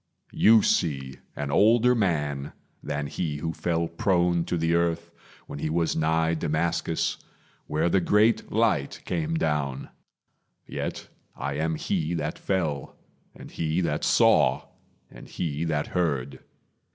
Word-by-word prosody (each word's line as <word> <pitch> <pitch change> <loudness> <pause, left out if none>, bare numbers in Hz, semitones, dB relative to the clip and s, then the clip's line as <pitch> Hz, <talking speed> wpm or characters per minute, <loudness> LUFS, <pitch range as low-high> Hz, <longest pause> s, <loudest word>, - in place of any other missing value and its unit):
You 110 0 +6
see 70 -6 0 0.2
an 70 -1 -3
older 115 +8 +5
man 75 - -1 0.3
than 70 0 -3
he 75 0 -3
who 80 +2 -3
fell 85 -1 -1
Prone 85 -1 +1
to 85 - -1
the 80 +1 +1
earth 85 -1 0 0.3
when - - -8
he 75 - -2
was 85 +1 0
nigh 80 +1 +1
Damascus, 80 +1 -1 0.5
Where 80 +2 0
the 95 +2 +2
great 105 +6 +2
light 110 -11 0
came 165 0 -2
down; 70 - -1 0.8
yet - - -5 0.3
I 70 - -3
am 80 +3 -1
he 80 +2 -1
That 75 -1 -3
fell, 80 -8 -2 0.4
and - - -12
he 80 +1 -1
that 75 -4 -1
saw, - - +3 0.4
and - - -12
he 80 -1 -3
that 75 -3 -1
heard. 70 -7 -2
80 Hz, 135 wpm, -26 LUFS, 75-90 Hz, 0.8 s, You